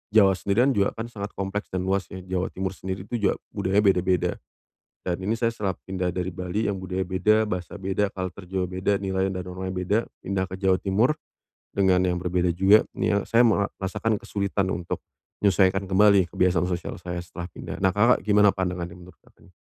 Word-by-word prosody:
Jawa 100 -3 +7
sendirian, 120 +7 +3
juga 100 -1 +2
kan 115 +1 -4
sangat 100 -2 -5
kompleks 100 +1 -3
dan 95 0 -2
luas 95 0 0
ya, 95 - -6
Jawa 95 0 -2
Timur 95 0 -3
sendiri 95 0 -5
itu 120 - -2
juga, - - +1 0.2
budaya 95 +2 +1
beda-beda. 95 -2 +2 0.7
Dan 90 -1 -1
ini 105 - +1
saya 115 -1 +2
setelah 100 -4 -2
pindah 90 -2 -2
dari 90 0 -2
Bali, 90 +5 -2
yang 100 - -1
budaya 95 0 -3
beda, 105 +4 +2
bahasa 90 0 -4
beda, 95 +1 0
culture 95 0 -5
juga 95 -1 -1
beda, 100 - +2
nilainya 95 -1 0
dan - - -6
normanya 95 +1 -5
beda. 90 +4 +1 0.3
Pindah 95 -1 0
ke 95 - -6
Jawa 95 -1 +3
Timur. 110 +10 +2 0.5
Dengan 95 -2 +3
yang 90 -1 +1
berbeda 90 0 0
juga, 95 +5 +5 0.2
nih - - +2
ya, 100 - +4
saya 120 +1 +4
merasakan 105 0 0
kesulitan 100 -1 -1
untuk, 85 -1 -4 0.4
menyesuaikan 95 -1 +3
kembali 100 -1 +5
kebiasaan 90 -1 +2
sosial 90 -2 -4
saya, 90 -1 -5
setelah 85 0 -7
pindah, - - -8
nah 95 -2 +2
Kakak 115 +2 +3
gimana 105 -1 +6
pandangannya, 90 -2 -3
menurut 90 +1 -14
Kakaknya? - - -23
95 Hz, 190 wpm, -25 LUFS, 90-100 Hz, 0.7 s, Jawa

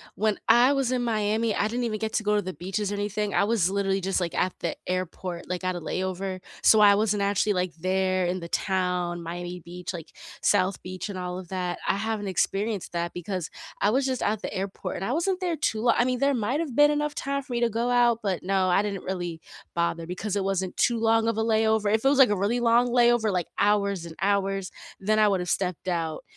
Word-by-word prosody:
when 215 0 +1
I 250 +4 +6
was 270 -2 0
in 250 -1 0
Miami, 220 0 0
I 210 - +1
didn't 240 +2 -2
even 215 -2 -2
get 220 0 -2
to 220 - 0
go 210 0 +2
to 205 - +2
the 185 -1 -5
beaches 195 +6 -3
or - - -2
anything, 205 0 -2
I - - +4
was 205 -4 +2
literally 195 -1 0
just, 190 +1 0
like, 170 -2 -2
at 185 - +1
the 170 - -2
airport, 185 -1 -4
like, 180 0 -4
at 185 0 -1
a - - -3
layover, 185 +2 -3 0.2
so 220 - +7
I 205 -1 +7
wasn't 210 -1 +1
actually, 205 +1 +1
like, 180 -1 -1
there 185 +1 0
in 180 +1 -1
the 170 - -7
town, 180 -2 -1
Miami 175 +1 -6
Beach, 180 +2 -7
like, 165 -2 -7 0.3
South 195 -1 +2
Beach 185 +3 -6
and 195 - -5
all 180 0 -4
of 180 -2 -11
that, 180 -2 -2
I - - +2
haven't 215 0 -2
experienced 195 +2 -1
that 170 0 -2
because 180 -1 -4 0.3
I 205 - +3
was 265 +2 +1
just 260 -2 -1
at 210 0 0
the - - -5
airport 195 +1 -4
and 195 - -3
I 245 - -1
wasn't 365 +3 0
there 355 -3 -1
too 220 -7 -1
lo 235 -1 +4
I 240 - +3
mean, 255 -1 0
there 280 0 +3
might’ve 255 +4 -1
been 295 +1 +6
enough 295 0 -1
time 280 +1 -2
for 265 - -13
me 240 - -1
to 235 - +3
go 240 +1 +1
out, 240 -1 +4
but, 190 -4 -1
no, 190 0 +1
I 180 +3 +4
didn't 200 -2 -4
really 175 -3 -3 0.4
bother 170 -1 -1
because 185 +3 -3
it 200 - 0
wasn't 190 -1 -1
too 240 - +2
long 225 0 +3
of 230 - 0
a 220 - +1
layover, 220 -1 +2
if 220 - +1
it 270 - +5
was, 280 - +2
like, 265 -4 +8
a 205 - +1
really 235 +4 +1
long 240 +1 +4
layover, 240 -3 +3
like, 180 -2 -1
hours 200 -3 +2
and 165 - -10
hours, 195 -1 0 0.3
then 215 +3 +1
I 215 - +5
would’ve 185 -3 0
stepped 185 -1 -2
out, 165 -3 -2
200 Hz, 240 wpm, -26 LUFS, 185-225 Hz, 0.4 s, like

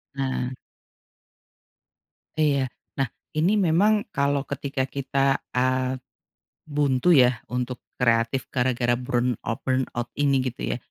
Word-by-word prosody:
Nah. 130 -2 -1 1.9
Iya. 140 -4 +2 0.3
Nah 135 - +2 0.3
ini 175 +8 +2
memang 205 +4 +3
kalau 140 0 +1
ketika 140 -1 -2
kita, 135 0 0
eee, 130 +1 +1 0.7
buntu 145 0 +2
ya 125 -3 +4
untuk 125 0 -3 0.2
kreatif 115 +1 +2
gara-gara 125 -1 +1
burnout-burnout 125 0 -1
ini 140 -1 +3
gitu 120 - -12
ya, - - -4
130 Hz, 100 wpm, -25 LUFS, 125-140 Hz, 1.9 s, ya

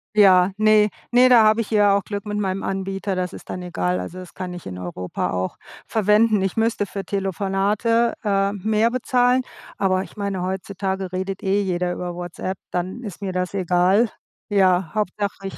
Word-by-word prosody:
Ja, 190 -3 +6
ne, 215 -1 +5 0.2
ne, 250 +1 +6
da 240 -3 +7
habe 215 +1 +4
ich 225 - -7
ja 205 -2 +4
auch 200 - -3
Glück 205 +1 -5
mit 210 0 -2
meinem 195 -1 -1
Anbieter, 195 0 -3
das 185 0 -2
ist - - -11
dann 180 - -5
egal. 90 - -1
Also, 175 - -6
das 180 - -11
kann 185 -1 -5
ich 175 - -9
in 90 -1 -6
Europa 90 0 -4
auch 95 0 -3 0.3
verwenden. 215 0 +3
Ich 195 - -1
müsste 225 -2 +1
für 195 0 -6
Telefonate, 200 +5 0
äh, 200 -1 +1
mehr 215 +3 +1
bezahlen, 250 0 +2 0.4
aber 185 -1 +2
ich - - -14
meine, 200 -3 -3
heutzutage 190 0 -3
redet 190 +1 -3
eh 195 +1 +1
jeder 180 -1 -1
über 175 -1 -5
WhatsApp, 175 +2 -5
dann 185 +6 -3
ist 205 -2 -8
mir 190 - -2
das 180 +1 -2
egal. 185 +4 +3 0.4
Ja, 185 -4 +3
Hauptsache 200 -1 -2
ich - - -8
195 Hz, 185 wpm, -22 LUFS, 185-210 Hz, 0.4 s, da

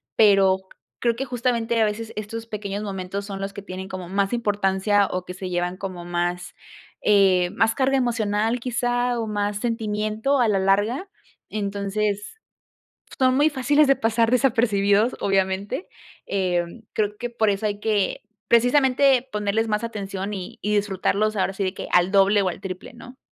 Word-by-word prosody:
Pero, 195 -3 +5 0.4
creo 235 -1 +1
que 270 - -2
justamente 235 -2 0
a - - +5
veces 215 +2 -4
estos 225 +2 -5
pequeños 205 -2 -4
momentos 195 0 -4
son 195 -1 -6
los 195 0 -3
que 200 - -7
tienen 190 -1 -7
como 185 -2 -6
más 195 +2 0
importancia 205 -2 +1
o 185 0 -3
que 180 - -7
se 185 0 -6
llevan 175 0 -1
como 185 -3 -6
más, 175 0 -2 0.5
eh, 190 -3 +4
más 225 +3 +3
carga 270 0 +2
emocional, 225 -2 0
quizá, 245 0 0
o 225 - -1
más 205 -1 -1
sentimiento 220 +3 -1
a 240 - +4
la 205 -2 +2
larga. 205 - +1 0.4
Entonces, 205 - -2 0.8
son 255 -1 +3
muy 295 +2 +4
fáciles 290 +2 +3
de 275 - +5
pasar 225 0 +1
desapercibidos, 225 -4 +2
obviamente, 195 - 0 0.4
em, 180 +1 -1
creo 210 -1 0
que 240 +1 -4
por 225 -2 +1
eso 200 +1 -1
hay 205 -1 -3
que, 210 -2 0 0.3
precisamente, 260 +2 +4
ponerles 210 +2 0
más 210 +1 0
atención 200 -2 -5
y 185 -3 -7
y 210 +1 0
disfrutarlos, 205 +1 0
ahora 195 0 0
sí 195 - -3
de 185 -1 -1
que, - - -7
al 180 +1 +4
doble 200 +1 +4
o 190 - +1
al 175 - -6
triple, 185 -2 -7
¿no? 245 +2 -13
210 Hz, 165 wpm, -23 LUFS, 195-230 Hz, 0.8 s, Pero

